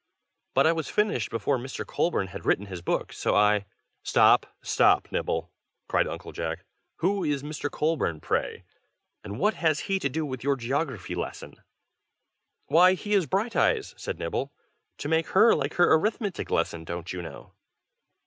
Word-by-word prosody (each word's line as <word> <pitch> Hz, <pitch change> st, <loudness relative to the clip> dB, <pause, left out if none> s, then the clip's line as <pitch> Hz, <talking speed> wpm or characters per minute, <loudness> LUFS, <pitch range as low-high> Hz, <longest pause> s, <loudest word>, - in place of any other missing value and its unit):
But 135 Hz, -, +5 dB
I 160 Hz, -, +5 dB
finished 210 Hz, +7 st, 0 dB
before 130 Hz, +3 st, 0 dB
Mr. 130 Hz, +2 st, -6 dB
Colburn 100 Hz, -, 0 dB
had 100 Hz, +3 st, -8 dB
written 100 Hz, -, +1 dB
his 95 Hz, -3 st, -7 dB
books, -, -, -2 dB
so -, -, +1 dB
I 105 Hz, -1 st, +3 dB, 0.2 s
" -, -, -51 dB
"Stop! -, -, +5 dB, 0.2 s
stop! -, -, +3 dB
Nibble!" 80 Hz, +1 st, -2 dB, 0.4 s
cried -, -, +2 dB
Uncle -, -, -7 dB
Jack. 80 Hz, +3 st, -4 dB, 0.4 s
"Who 195 Hz, +2 st, +1 dB
is 145 Hz, -3 st, -1 dB
Mr. 150 Hz, -1 st, -4 dB
Colburn, 150 Hz, -, -1 dB
pray? -, -, -2 dB, 0.6 s
and 105 Hz, 0 st, -6 dB
what 210 Hz, -, +2 dB
has 155 Hz, -2 st, +1 dB
he 195 Hz, 0 st, -1 dB
to 140 Hz, -, -1 dB
do 155 Hz, +4 st, -2 dB
with 130 Hz, -4 st, -6 dB
your 140 Hz, 0 st, +2 dB
geography 130 Hz, -, -3 dB
lesson?" -, -, -5 dB, 1.1 s
"Why, 175 Hz, +5 st, +6 dB
he 205 Hz, +3 st, -3 dB
is 190 Hz, -6 st, +3 dB
Brighteyes!" 230 Hz, -, +1 dB
said -, -, -5 dB
Nibble. -, -, -3 dB, 0.5 s
"To 145 Hz, -, -5 dB
make 160 Hz, +1 st, +1 dB
her 230 Hz, -, +7 dB
like 145 Hz, 0 st, -2 dB
her 175 Hz, -, +5 dB
arithmetic 205 Hz, +3 st, 0 dB
lesson, 80 Hz, -1 st, -1 dB
don't 85 Hz, +2 st, -5 dB
you 90 Hz, -, -4 dB
know?" -, -, -10 dB
145 Hz, 165 wpm, -27 LUFS, -, 1.1 s, her